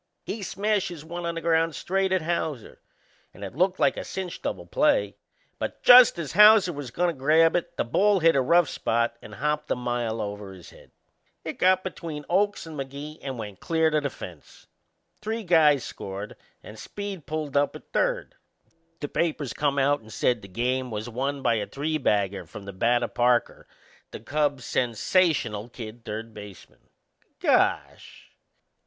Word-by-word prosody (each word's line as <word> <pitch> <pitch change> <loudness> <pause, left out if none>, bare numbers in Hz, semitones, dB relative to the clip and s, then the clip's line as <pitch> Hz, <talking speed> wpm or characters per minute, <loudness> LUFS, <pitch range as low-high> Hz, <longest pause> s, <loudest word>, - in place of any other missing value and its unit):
He 220 - -5
smashes 195 -5 -2
one 170 +1 -5
on 170 - -3
the 165 - -4
ground 165 -1 +1
straight 190 +1 -1
at 185 -3 +1
Hauser 160 -7 -3 0.5
and 100 - -10
it 100 - -6
looked 185 +6 +1
like 140 -2 +2
a - - -4
cinch 190 -2 -6
double - - -4
play; - - +1 0.4
but - - -5
just 245 -5 +9
as 160 -4 -4
Hauser 210 -3 +7
was 145 -3 -6
goin' 175 +8 0
to - - -2
grab 155 +4 +3
it 170 0 -2
the - - +1
ball 195 - +2
hit 165 -2 +4
a 135 - +4
rough 170 +5 +4
spot 115 -2 -1
and - - -11
hopped 150 +2 -2
a - - +1
mile 120 -2 -2
over 100 -2 -5
his 90 -3 -13
head. - - -18 0.6
It - - -6
got 185 0 +4
between 165 -5 -6
Oakes 205 +2 +1
and 160 -1 -9
Magee 140 +2 -7
and 135 -2 -5
went 105 -4 -7
clear 160 -1 +1
to 150 0 +2
the 140 - -2
fence. 85 - -12 0.6
Three 220 +1 -3
guys 155 - +4
scored 100 +2 -7 0.3
and 110 0 -11
Speed 200 -7 -7
pulled 155 -1 -4
up 145 0 +2
at - - -13
third. - - 0 0.7
The 145 - -2
papers 150 -4 -2
come 145 -1 0
out 140 0 +2
and 110 0 -15
said 120 -1 0
the 100 - -11
game 125 +6 -1
was 110 +1 -5
won 135 +3 -3
by 115 -2 +2
a 105 - -3
three 155 +3 -2
bagger 100 - 0
from 100 - -10
the 100 - -7
bat 120 +5 +2
o' - - 0
Parker, 120 0 +1 0.4
the - - -8
Cubs' 140 +2 -1
sensational 120 - +1
kid 115 -1 -9
third 110 +1 -6
baseman. 105 -2 -13 0.5
Gosh! - - 0
145 Hz, 180 wpm, -26 LUFS, 115-170 Hz, 0.7 s, just